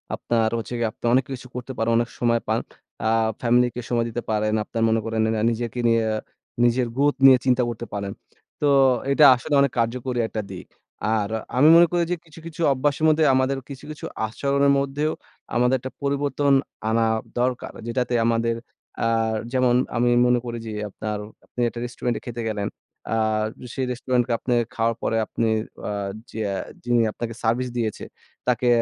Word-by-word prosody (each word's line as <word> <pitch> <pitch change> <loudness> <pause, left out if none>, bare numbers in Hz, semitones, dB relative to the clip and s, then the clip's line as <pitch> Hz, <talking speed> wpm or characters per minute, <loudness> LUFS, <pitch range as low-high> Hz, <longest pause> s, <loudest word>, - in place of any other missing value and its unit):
আপনার 115 -2 +1
হচ্ছে 115 +2 -5
গিয়ে 115 -1 +1
আপনার 120 - -2
অনেক 130 0 +4
কিছু 125 0 -8
করতে 125 +1 -5
পারেন, 115 +1 +1
অনেক 120 +1 0
সময় 115 -1 +2
পান। - - +1 0.5
আ - - +3 0.3
ফ্যামিলি 125 +1 +4
কে 125 - -3
সময় 120 -1 +1
দিতে 120 +1 -4
পারেন, 110 0 +1
আপনার 115 +1 -3
মনে 115 0 +2
করেন 115 -1 -1
না 105 - -1
নিজেকে 120 +1 -3
নিয়ে, 115 -1 +3 0.6
নিজের 120 +1 +3
গ্রথ 145 +1 +2
নিয়ে 130 -1 +9
চিন্তা 125 -1 +3
করতে 120 0 -5
পারেন। 100 -1 -3 0.5
তো 145 - +3 0.4
এটা 145 +2 +6
আসলে 145 +4 -5
অনেক 140 -2 +2
কার্যকরী 120 +2 -1
একটা 110 - -3
দিক। 90 - -8 0.5
আর 105 -1 -1 0.3
আমি 145 +4 +6
মনে 170 +1 +8
করি 175 -1 +2
যে - - +2
কিছু, 160 0 -14
কিছু, 165 0 -7
অভ্যাসের 145 +3 0
মধ্যে 155 0 +4
আমাদের 130 +1 +1
কিছু, 135 -1 -9
কিছু, 150 - -8 0.2
আচরণের 140 +5 +1
মধ্যেও 140 +3 -1 0.4
আমাদের 125 +2 +3
একটা 130 +1 -7
পরিবর্তন 140 0 +1 0.4
আনা 115 +1 +2 0.4
দরকার। 125 0 -1 0.2
যেটাতে 125 +1 -1
আমাদের 115 0 +1 0.5
আ - - +3 0.5
যেমন 125 -1 +3 0.2
আমি 120 +1 +3 0.2
মনে 125 0 +3
করি 120 0 -4
যে - - -4 0.2
আপনার 105 +1 -4 0.3
আপনি 125 - -6
একটা 120 - -8
রেস্টুরেন্টে 120 -1 -3
খেতে 120 -1 -5
গেলেন, 105 -2 -2 0.4
আ - - +2 0.6
সেই 130 - -1
রেস্টুরেন্টকে 125 0 0
আপনে 125 - 0 0.2
খাওয়ার 115 0 +1
পরে 115 - 0
আপনি 115 - -1 0.4
আ - - -2 0.4
যেয়া 105 -3 -2 0.3
যিনি 120 -1 +2
আপনাকে 115 +1 -5
সার্ভিস 120 +3 +1
দিয়েছে, 110 -3 -2 0.4
তাকে 125 0 +1
120 Hz, 175 wpm, -23 LUFS, 115-130 Hz, 0.6 s, নিয়ে